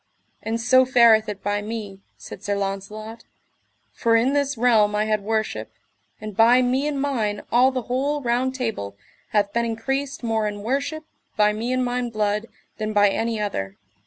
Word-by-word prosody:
And 225 +1 -2
so 255 +2 +5
fareth 235 -4 +5
it 200 -2 -6
by 205 0 -1
me, 210 -2 -6 0.2
said 190 - -11
Sir 205 - -1
Launcelot, 200 +3 -5 0.7
for 230 -1 +2
in 245 +4 +3
this 280 -2 0
realm 220 -3 +3
I 210 +1 +1
had 215 -1 0
worship, 205 - -2 0.5
and 215 -1 -7
by 240 +4 +5
me 260 +4 +1
and 290 -2 -2
mine 225 -8 -1
all 250 +2 +5
the 255 -2 -3
whole 275 +5 -1
Round 255 0 0
Table 215 - -4 0.3
hath 205 -1 +1
been 235 - +1
increased 270 +5 -3
more 225 -2 0
in 205 -1 -5
worship, 280 +6 -2 0.3
by 210 0 +4
me 230 +4 -3
and 255 0 +1
mine 245 0 -2
blood, 210 0 -1 0.3
than 215 0 -2
by 205 -1 +5
any 225 +2 -1
other. 100 - -3
225 Hz, 175 wpm, -23 LUFS, 210-250 Hz, 0.7 s, so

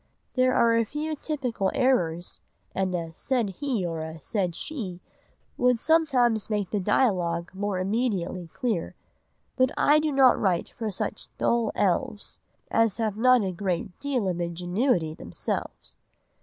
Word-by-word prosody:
There 255 0 +3
are 230 -1 +4
a 230 - +3
few 300 +6 -3
typical 255 -10 -2
errors; 175 -10 +1 0.3
and 190 -1 0
a 165 -2 -4
'said 235 +2 -1
he' 250 -10 0
or 165 -2 -3
a 160 0 -6
'said 180 +1 -2
she' 195 - -5 0.6
would 250 -1 +3
sometimes 255 -9 +3
make 205 -4 -1
the 210 - 0
dialogue 180 -5 +1
more 200 0 -2
immediately 185 -3 -1
clear; 230 -11 -2 0.6
but 255 -1 +3
'I 300 +1 +5
do 305 0 0
not 270 -2 +5
write 180 -4 +1
for 220 -1 -4
such 195 - -4
dull 235 -2 +1
elves' 200 +2 -1 0.3
as 225 -3 +3
have 220 -3 -1
not 250 +1 +5
a 190 - -1
great 180 +1 -3
deal 265 -8 -1
of 175 -1 -1
ingenuity 175 - 0
themselves.... 85 - -5
210 Hz, 145 wpm, -26 LUFS, 180-255 Hz, 0.6 s, I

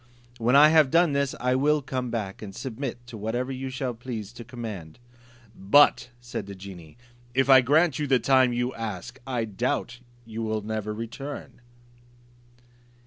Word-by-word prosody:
When 120 +3 +2
I 150 +2 +8
have 155 -3 +5
done 165 0 +3
this, 140 -1 0
I 125 +1 +1
will 145 +3 +2
come 130 -2 -3
back 105 -5 -4
and 100 -3 -8
submit 125 -1 -5
to 120 -2 -9
whatever 120 +5 -2
you 130 0 -4
shall 130 -1 -3
please 115 -3 -7
to 120 - -9
command." 110 -9 -8 0.6
"But," 125 +6 +4
said 120 -4 -6
the 100 - -8
genie, 95 -4 -11 0.4
"if 135 +1 +3
I 130 -1 +9
grant 150 +3 +3
you 150 - -1
the 130 -1 +4
time 130 0 +4
you 120 +1 -1
ask, 115 +3 -6
I 120 -3 -1
doubt 120 +3 -2 0.3
you 115 0 -6
will 110 -1 -1
never 110 0 -3
return?" 120 +6 -7
120 Hz, 165 wpm, -26 LUFS, 110-135 Hz, 0.6 s, I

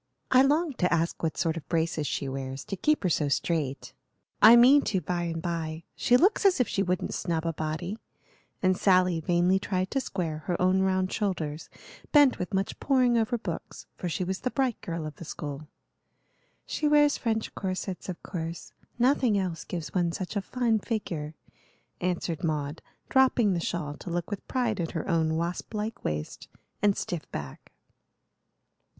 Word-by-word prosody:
"I 255 - +7
longed 290 0 +2
to 180 - +2
ask 165 0 0
what 160 -2 -1
sort 165 -1 0
of 160 - -9
braces 160 -3 0
she 140 - -2
wears, 135 0 -5
to 195 - -4
keep 300 +7 +1
her 185 - +2
so 150 -2 +1
straight. 140 0 -1 0.5
I 220 +3 +10
mean 260 +5 +7
to 190 - +1
by 175 +1 -2
and 165 -1 -3
by; 165 -2 -3
she 245 - +4
looks 385 +11 +3
as 385 -6 +4
if 250 - +3
she 195 - -1
wouldn't 180 -2 -1
snub 165 -2 -2
a 165 - 0
body;" 160 +7 -4 0.6
and 185 0 +4
Sally 180 -3 +3
vainly 175 +3 +2
tried 185 -1 -2
to 270 - +1
square 170 -9 -3
her 175 - 0
own 185 +1 +3
round 185 0 +1
shoulders, 165 -7 -2 0.4
bent 290 -3 +5
with 180 - -3
much 195 0 -1
poring 255 -3 +3
over 230 +1 +1
books, 175 -7 -6
for 180 - -4
she 165 +3 -1
was 190 +1 -2
the 255 - -1
bright 260 -3 -1
girl 165 -2 -4
of 150 -1 -7
the - - -8
school. 150 -1 -6 1.0
"She 305 - -1
wears 295 -1 +4
French 225 -2 -1
corsets, 190 -1 -4
of 180 - -6
course. 165 -1 -6 0.2
Nothing 245 -3 +3
else 180 -4 -2
gives 170 -3 -6
one 175 -2 +1
such 185 +2 -5
a 200 - +1
fine 230 0 0
figure," 170 -9 -4 0.6
answered 175 -3 -2
Maud, 150 -1 -2 0.3
dropping 255 -6 +4
the 175 - 0
shawl 150 -4 -3
to - - -8
look 175 +2 -3
with 205 - -5
pride 240 -6 0
at 165 -2 -2
her 165 - -3
own 160 -3 +1
wasp 170 +5 -3
like 215 +2 -4
waist 75 0 -4 0.3
and 205 -1 +3
stiff 175 -4 -4
back. 70 -2 -7
180 Hz, 180 wpm, -28 LUFS, 165-220 Hz, 1.0 s, I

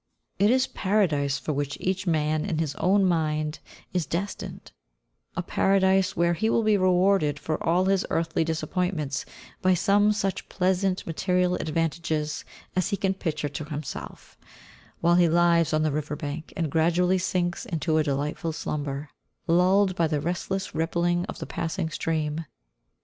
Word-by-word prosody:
It 205 - +5
is 260 +2 +4
Paradise 160 - +1
for 155 - -3
which 145 0 -2
each 190 +1 -2
man, 155 -1 +1
in 180 -5 -2
his 155 -3 -1
own 195 +2 +3
mind, 155 -3 0 0.3
is 175 -5 0
destined; 195 +5 -5 0.6
a 180 - -2
Paradise 190 +1 +2
where 170 +1 +3
he 220 +6 0
will 230 - +2
be 215 -1 +4
rewarded 185 -5 +3
for 155 +2 -3
all 175 +3 +2
his 195 -1 +2
earthly 165 0 0
disappointments 160 -2 -2 0.4
by 185 0 +4
some 205 +4 +3
such 195 -2 -2
pleasant 185 0 0
material 180 +2 +1
advantages 160 -2 -1 0.3
as 185 - +1
he 200 - -1
can 190 -1 +1
picture 155 -6 -3
to 150 +1 -5
himself, 150 -2 -7 0.6
while 170 +1 +4
he 175 -2 +5
lies 170 -1 +3
on 155 0 +2
the 155 - +1
river 150 0 -2
bank 150 +1 -6
and 160 -4 -1
gradually 175 +4 +2
sinks 175 -1 -1
into 160 -1 0
a - - +3
delightful 150 +3 -2
slumber, 145 -2 -4 0.4
lulled 185 +3 +3
by 170 -3 +2
the 150 -2 0
restful 175 +4 -2 0.2
rippling 175 +2 0
of - - -6
the - - -5
passing 165 0 -3
stream. 155 0 -2
170 Hz, 155 wpm, -26 LUFS, 155-185 Hz, 0.6 s, It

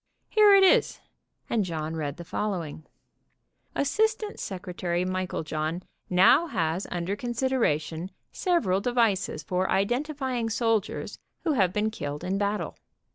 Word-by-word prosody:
Here 420 -2 +7
it 390 - +6
is," 380 - +4 0.5
and 225 -3 +1
John 160 -3 -3
read 145 -3 -3
the 170 - -7
following: 170 -5 -4 0.9
"Assistant 430 +8 0
Secretary 180 -2 -3
Meiklejohn 175 -3 -2 0.3
now 190 - +5
has 165 - -1
under 175 +3 -2
consideration 225 - -1 0.2
several 230 - +1
devices 230 -5 +1
for 185 0 -1
identifying 250 +2 0
soldiers 225 -2 -1 0.2
who 330 - +1
have 195 - +3
been 210 +2 0
killed 145 -8 -5
in 190 +2 -1
battle. 205 +1 -2
195 Hz, 120 wpm, -27 LUFS, 175-245 Hz, 0.9 s, Here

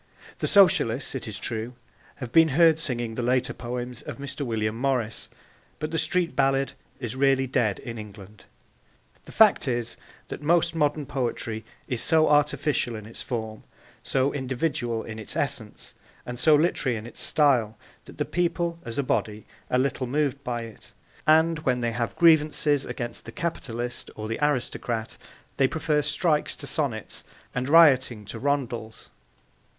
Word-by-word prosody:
The - - -1
Socialists, 140 - +4
it 130 -3 -5
is 110 - -5
true, 115 +2 -4 0.4
have 125 -4 -7
been 165 +3 +6
heard 165 -2 +6
singing 120 -7 -2
the 125 - -3
later 125 +1 +1
poems 125 0 -5
of - - -7
Mr. 140 +1 -5
William 110 -3 -1
Morris, 125 -3 -1 0.5
but 155 +1 -4
the 165 - 0
street 180 -2 0
ballad 135 0 +2 0.3
is 120 -2 -4
really 135 0 +3
dead 115 -5 +1
in 115 -1 -7
England. 105 -1 -11 0.8
The - - -11
fact 215 -8 +5
is 120 -2 -2 0.3
that - - -6
most 170 +2 +2
modern 150 -2 0
poetry 120 -4 -3 0.2
is 125 -3 -2
so 160 -1 +4
artificial 145 -4 +2
in 110 -1 -8
its 115 - -8
form, 110 -3 -5 0.4
so 135 +1 0
individual 130 -3 -2
in 110 -1 -7
its 110 - -3
essence - - -3 0.3
and 120 0 -6
so 155 +1 +6
literary 145 -6 +1
in 110 - -7
its 120 - -9
style, 125 -8 +2 0.3
that - - -13
the - - -1
people 170 -1 -1
as 115 - -6
a 140 - +1
body 110 -6 -1 0.2
are 125 - +2
little 130 0 0
moved 140 +1 -1
by 120 -2 -3
it, 115 -2 -12 0.3
and 160 +1 +4
when 125 -4 0
they 120 -1 0
have 115 0 -3
grievances 150 -3 +4
against 120 -2 -5
the 115 - -8
capitalist 120 -6 -4
or 110 0 -5
the 115 - -3
aristocrat 120 -5 -1 0.4
they 135 - +4
prefer 155 0 0
strikes 150 +1 0
to - - -8
sonnets 125 - -2 0.3
and 125 +2 -2
rioting 130 -9 +5
to 110 +3 -7
rondels. 120 -5 -3
130 Hz, 160 wpm, -26 LUFS, 115-150 Hz, 0.8 s, been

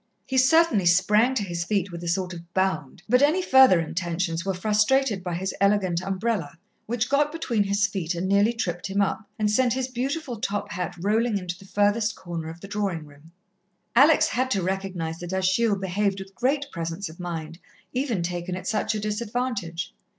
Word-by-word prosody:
He 260 -1 +1
certainly 260 - +4
sprang 210 +8 +4
to 215 - 0
his 170 -3 -3
feet 195 0 -1
with 170 0 -7
a - - -5
sort 180 +1 -1
of 170 0 -11
bound, 185 -5 -1
but 250 +3 +4
any 300 +6 +4
further 265 - +6
intentions 170 0 -2
were 195 0 -1
frustrated 215 +2 +2
by 175 -2 -3
his 190 +2 -3
elegant 195 -4 +2
umbrella, 190 -4 -2 0.3
which 240 +1 0
got 290 +2 +2
between 240 -10 0
his 200 +1 +2
feet 190 -4 -2
and 175 +2 -2
nearly 200 +3 +4
tripped 175 -7 -3
him 195 +1 -1
up, 205 +2 -1
and 210 -1 +1
sent 245 +1 +3
his 260 -1 -1
beautiful 260 0 -3
top 205 -1 -2
hat 180 +1 -3
rolling 215 +4 +1
into 180 -2 -4
the 195 - -15
furthest 210 +2 +1
corner 170 -3 -6
of 165 +1 -10
the 200 - -8
drawing 195 -6 -2
room. 145 +2 -17 0.6
Alex 290 +6 +6
had 255 +2 0
to 195 -7 0
recognize 185 -3 -3
that 175 +1 -6
Achille 190 +4 +2
behaved 195 +1 -1
with 195 0 -9
great 275 +8 0
presence 170 +3 -4
of 160 +2 -12
mind, 165 -2 -5 0.3
even 245 -8 -1
taken 175 +1 -3
at 185 0 -7
such 215 +2 0
a - - -1
disadvantage. 210 -4 -3
195 Hz, 190 wpm, -25 LUFS, 175-230 Hz, 0.6 s, further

